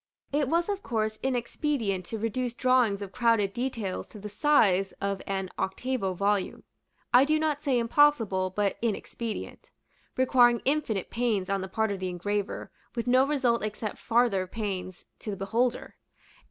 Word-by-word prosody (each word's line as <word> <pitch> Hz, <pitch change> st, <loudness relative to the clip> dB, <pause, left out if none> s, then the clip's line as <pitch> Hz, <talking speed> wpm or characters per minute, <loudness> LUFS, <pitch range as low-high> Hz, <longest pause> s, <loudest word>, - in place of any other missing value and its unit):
It 290 Hz, -1 st, +2 dB
was 340 Hz, +2 st, +2 dB
of 405 Hz, -1 st, -2 dB
course 215 Hz, -, -2 dB
inexpedient 240 Hz, -, -1 dB
to 225 Hz, -, -5 dB
reduce 235 Hz, +3 st, -2 dB
drawings 245 Hz, -6 st, +2 dB
of 195 Hz, -, -8 dB
crowded 225 Hz, -3 st, +2 dB
details 235 Hz, -6 st, -3 dB
to -, -, -13 dB
the 210 Hz, +1 st, -7 dB
size 200 Hz, -7 st, +3 dB
of 200 Hz, -1 st, -3 dB
an 190 Hz, -1 st, -2 dB
octavo 195 Hz, -1 st, -2 dB
volume, 200 Hz, +1 st, 0 dB, 0.5 s
I 250 Hz, +2 st, +8 dB
do 310 Hz, +2 st, +2 dB
not 310 Hz, -2 st, 0 dB
say 270 Hz, -4 st, +1 dB
impossible, 230 Hz, -6 st, +3 dB
but 200 Hz, +1 st, -1 dB
inexpedient; 230 Hz, 0 st, -4 dB, 0.5 s
requiring 245 Hz, -2 st, +4 dB
infinite 265 Hz, -9 st, 0 dB
pains 220 Hz, -6 st, 0 dB
on 195 Hz, -1 st, 0 dB
the 190 Hz, -, -4 dB
part 220 Hz, +2 st, 0 dB
of 200 Hz, -, -3 dB
the 185 Hz, 0 st, -2 dB
engraver, 200 Hz, +3 st, -3 dB, 0.2 s
with 235 Hz, -, -2 dB
no 255 Hz, +2 st, +4 dB
result 260 Hz, -5 st, +1 dB
except 215 Hz, 0 st, -4 dB
farther 230 Hz, -6 st, +2 dB
pains 190 Hz, -3 st, -5 dB
to -, -, -7 dB
the 200 Hz, -, -3 dB
beholder. 230 Hz, +6 st, -1 dB
225 Hz, 155 wpm, -28 LUFS, 195-255 Hz, 0.5 s, I